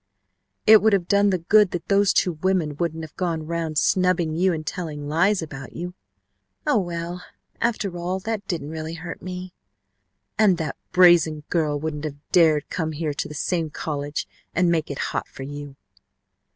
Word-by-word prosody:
"It 215 Hz, 0 st, +8 dB
would 220 Hz, -1 st, +4 dB
have 180 Hz, -3 st, +1 dB
done 200 Hz, 0 st, +4 dB
the 185 Hz, -, +2 dB
good 205 Hz, +4 st, +4 dB
that 175 Hz, -2 st, -5 dB
those 200 Hz, -1 st, +4 dB
two 180 Hz, -, +2 dB
women 185 Hz, -6 st, +1 dB
wouldn't 165 Hz, -1 st, -2 dB
have 155 Hz, -, -10 dB
gone 170 Hz, -4 st, -1 dB
around 165 Hz, -1 st, -3 dB
snubbing 180 Hz, -1 st, +2 dB
you 185 Hz, +3 st, +3 dB
and 155 Hz, -2 st, -3 dB
telling 150 Hz, -5 st, -5 dB
lies 175 Hz, +5 st, +2 dB
about 135 Hz, -4 st, -8 dB
you 175 Hz, +1 st, -5 dB, 0.4 s
" 95 Hz, -1 st, -50 dB
"Oh, -, -, +3 dB
well, 175 Hz, -1 st, -4 dB, 0.4 s
after 215 Hz, -6 st, 0 dB
all, 175 Hz, +2 st, -2 dB
that 215 Hz, -1 st, -3 dB
didn't 155 Hz, -4 st, -3 dB
really 160 Hz, +1 st, -5 dB
hurt 170 Hz, +1 st, -7 dB
me 180 Hz, 0 st, -6 dB, 0.4 s
" 95 Hz, -, -41 dB
"And 200 Hz, -5 st, +5 dB
that 160 Hz, -2 st, -3 dB, 0.2 s
brazen 175 Hz, -4 st, +5 dB
girl 150 Hz, -4 st, +1 dB
wouldn't 155 Hz, 0 st, -4 dB
have 145 Hz, -2 st, -5 dB
dared 155 Hz, -4 st, +4 dB
come 160 Hz, -3 st, -2 dB
here 155 Hz, -1 st, -2 dB
to -, -, -3 dB
the 150 Hz, -, -9 dB
same 165 Hz, +1 st, -1 dB
college 145 Hz, -1 st, -4 dB, 0.3 s
and 180 Hz, 0 st, +3 dB
make 160 Hz, -2 st, 0 dB
it 140 Hz, -, -4 dB, 0.2 s
hot -, -, -2 dB
for 135 Hz, -, -9 dB
you 145 Hz, 0 st, -7 dB
165 Hz, 185 wpm, -24 LUFS, 150-180 Hz, 0.4 s, It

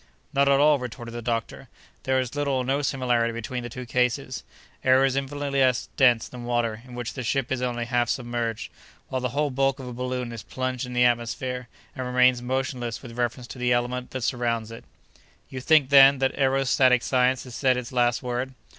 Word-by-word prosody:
"Not 140 Hz, 0 st, +3 dB
at 140 Hz, 0 st, +4 dB
all," 150 Hz, 0 st, +5 dB
retorted 120 Hz, -1 st, -7 dB
the 120 Hz, -, -5 dB
doctor, 115 Hz, -1 st, -3 dB, 0.4 s
"there 130 Hz, 0 st, +2 dB
is 125 Hz, -2 st, -3 dB
little 145 Hz, -2 st, 0 dB
or 130 Hz, -1 st, -1 dB
no 135 Hz, +3 st, 0 dB
similarity 125 Hz, -4 st, 0 dB
between 120 Hz, +2 st, -5 dB
the 120 Hz, -, -6 dB
two 125 Hz, +2 st, -7 dB
cases. 125 Hz, +1 st, -1 dB, 0.4 s
Air 130 Hz, +1 st, +5 dB
is 135 Hz, -1 st, 0 dB
infinitely 140 Hz, 0 st, -2 dB
less 130 Hz, -2 st, +2 dB
dense 125 Hz, -4 st, +4 dB
than 125 Hz, -1 st, -9 dB
water, 120 Hz, -2 st, -1 dB
in 125 Hz, -, -10 dB
which 120 Hz, -1 st, -5 dB
the 130 Hz, -, -5 dB
ship 130 Hz, +2 st, -1 dB
is 130 Hz, -1 st, -1 dB
only 120 Hz, -1 st, -2 dB
half 120 Hz, -1 st, 0 dB
submerged, 120 Hz, -3 st, -3 dB, 0.4 s
while 130 Hz, -, -2 dB
the 125 Hz, -, -1 dB
whole 145 Hz, +3 st, -1 dB
bulk 135 Hz, +1 st, +1 dB
of 130 Hz, -, -7 dB
a 125 Hz, -, -6 dB
balloon 125 Hz, 0 st, -3 dB
is 115 Hz, -2 st, -7 dB
plunged 130 Hz, +1 st, -4 dB
in 125 Hz, -, -7 dB
the 125 Hz, 0 st, +4 dB
atmosphere, 125 Hz, +1 st, -1 dB, 0.3 s
and 130 Hz, -1 st, -4 dB
remains 125 Hz, 0 st, +3 dB
motionless 125 Hz, -2 st, -3 dB
with 120 Hz, -2 st, -10 dB
reference 120 Hz, +1 st, -2 dB
to 125 Hz, -, -10 dB
the 125 Hz, 0 st, +1 dB
element 125 Hz, +1 st, -1 dB
that 130 Hz, -2 st, -5 dB
surrounds 115 Hz, -3 st, -1 dB
it." 115 Hz, -, -10 dB, 0.6 s
"You 130 Hz, -, -6 dB
think, 150 Hz, -1 st, +4 dB
then, 135 Hz, 0 st, +8 dB
that 135 Hz, 0 st, 0 dB
aerostatic 130 Hz, -2 st, +3 dB
science 125 Hz, -1 st, +2 dB
has 125 Hz, -, -11 dB
said 130 Hz, 0 st, +2 dB
its 125 Hz, -1 st, -5 dB
last 120 Hz, -1 st, +1 dB
word?" 125 Hz, +1 st, -3 dB
125 Hz, 210 wpm, -25 LUFS, 120-130 Hz, 0.6 s, then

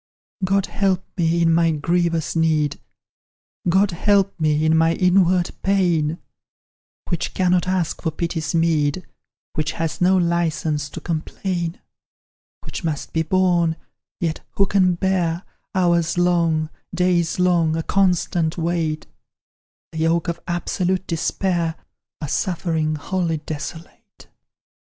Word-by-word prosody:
"God 195 Hz, +1 st, +2 dB
help 190 Hz, -2 st, 0 dB
me 170 Hz, -1 st, +2 dB
in 165 Hz, 0 st, +4 dB
my 165 Hz, 0 st, +4 dB
grievous 165 Hz, +1 st, 0 dB
need, 155 Hz, -3 st, +1 dB, 0.9 s
God 190 Hz, +3 st, +3 dB
help 195 Hz, +2 st, +2 dB
me 155 Hz, -1 st, +2 dB
in 160 Hz, +1 st, +4 dB
my 165 Hz, +1 st, +4 dB
inward 180 Hz, -1 st, +3 dB
pain; 175 Hz, -5 st, +1 dB, 0.9 s
Which 175 Hz, -2 st, -2 dB
cannot 180 Hz, -1 st, +2 dB
ask 185 Hz, -3 st, -1 dB
for 165 Hz, -, 0 dB
pity's 165 Hz, 0 st, -3 dB
meed, 165 Hz, 0 st, +1 dB, 0.5 s
Which 155 Hz, -1 st, -1 dB
has 165 Hz, 0 st, -3 dB
no 185 Hz, +1 st, +5 dB
licence 160 Hz, -4 st, 0 dB
to -, -, -8 dB
complain, 170 Hz, +1 st, -3 dB, 0.8 s
"Which -, -, -6 dB
must 155 Hz, -3 st, -3 dB
be 160 Hz, -, +2 dB
borne; 175 Hz, -1 st, +2 dB, 0.4 s
yet 165 Hz, -2 st, -1 dB
who 195 Hz, -, +3 dB
can 185 Hz, -2 st, +3 dB
bear, 175 Hz, -1 st, 0 dB, 0.3 s
Hours 170 Hz, -2 st, +2 dB
long, 170 Hz, -3 st, +2 dB, 0.2 s
days 175 Hz, -2 st, +1 dB
long, 175 Hz, -3 st, +2 dB
a 165 Hz, -, -2 dB
constant 180 Hz, -3 st, +1 dB
weight 165 Hz, -2 st, -1 dB, 0.9 s
The 160 Hz, -, -6 dB
yoke 165 Hz, +2 st, +1 dB
of 170 Hz, -, -2 dB
absolute 180 Hz, +1 st, -1 dB
despair, 170 Hz, 0 st, -1 dB, 0.5 s
A 150 Hz, -, -3 dB
suffering 160 Hz, -1 st, -1 dB
wholly 165 Hz, +1 st, -1 dB
desolate? 155 Hz, +2 st, -9 dB
170 Hz, 120 wpm, -21 LUFS, 160-180 Hz, 0.9 s, no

